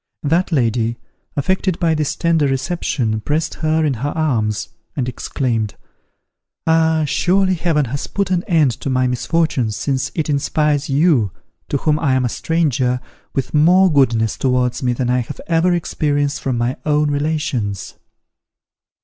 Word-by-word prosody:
That 165 +5 +1
lady, 115 -4 +1 0.4
affected 185 +4 0
by 165 -2 +2
this 150 -2 -1
tender 165 -4 +2
reception, 130 -5 -1
pressed 155 +6 -1
her 160 0 +2
in 145 - +1
her 145 - 0
arms, 115 -11 -1 0.3
and 130 -4 -1
exclaimed, 120 -4 -2 0.9
"Ah 160 -1 +3
surely 185 +6 +2
Heaven 165 -4 +1
has 135 +3 -4
put 200 -2 -2
an 180 -1 +1
end 160 - +3
to - - -2
my 130 -1 +2
misfortunes, 125 -3 0
since 135 -2 -1
it 160 - -1
inspires 150 0 0
you, 140 - +3 0.4
to 140 - +1
whom 150 +2 +1
I 135 -5 +2
am 130 -1 +1
a - - 0
stranger, 130 -5 0 0.4
with 135 - -2
more 175 +4 +5
goodness 115 -6 +2
towards 125 -2 +1
me 125 -2 +1
than 125 0 -1
I 125 - +2
have 120 - -6
ever 170 +2 +2
experienced 145 -4 0
from 130 -3 -1
my 120 +4 -1
own 150 -1 +2
relations!" 145 - -2
145 Hz, 150 wpm, -19 LUFS, 125-160 Hz, 0.9 s, more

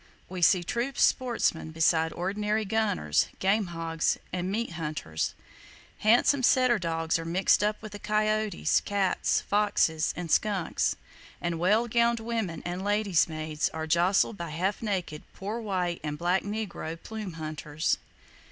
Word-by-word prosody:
We 185 -1 -6
see 175 +1 +5
true 240 +8 -2
sportsmen 235 -10 +1
beside 160 0 +2
ordinary 210 +4 -1
gunners, 200 - +1
game 195 +1 +1
hogs 165 -1 -1 0.2
and 180 +1 -2
meat 225 -1 -2
hunters; 150 - -3 0.6
handsome 240 +5 +4
setter 255 -2 +4
dogs 165 -1 -1
are - - -4
mixed 180 +4 +2
up 210 0 0
with 205 -1 -8
coyotes, 215 0 +1
cats, 200 -2 +1
foxes 200 -6 +1
and 175 -3 -4
skunks; 200 -5 +1 0.4
and 170 -1 -2
well 210 +7 +3
gowned 235 0 +2
women 225 -8 -3
and 175 +2 -3
ladies' 205 -4 +2
maids 155 -1 -2
are 160 0 -3
jostled 175 +6 +2
by 170 -1 -5
half 185 +6 -1
naked 185 -8 -3
"poor 210 +4 -4
white" 180 -5 -1
and 150 -1 -3
black 175 +4 +1
negro 205 -6 -4
"plume 215 -5 -6
hunters." 155 -1 -2
185 Hz, 140 wpm, -28 LUFS, 165-215 Hz, 0.6 s, see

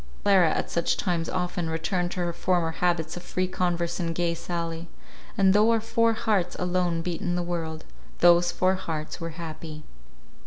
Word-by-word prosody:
Clara 190 -5 +5
at - - -2
such 170 0 +1
times 170 -3 -1
often 180 -2 -2
returned 175 +2 -1
to 180 - -3
her 175 -1 -1
former 175 -1 +1
habits 165 -1 0
of 175 - -6
free 185 +1 -2
converse 175 -2 -1
and 165 -2 -2
gay 170 -1 +1
sally; 170 0 -4 0.5
and 190 -1 +5
though 210 +2 +5
our 230 -1 +4
four 230 +1 +2
hearts 210 -5 0
alone 180 -2 0
beat 175 -2 -3
in 175 - -1
the 175 - 0
world, 165 -2 -4 0.3
those 175 0 +5
four 185 0 +2
hearts 165 -3 -4
were 165 - -3
happy. 155 -2 -7
175 Hz, 180 wpm, -26 LUFS, 165-185 Hz, 0.5 s, Clara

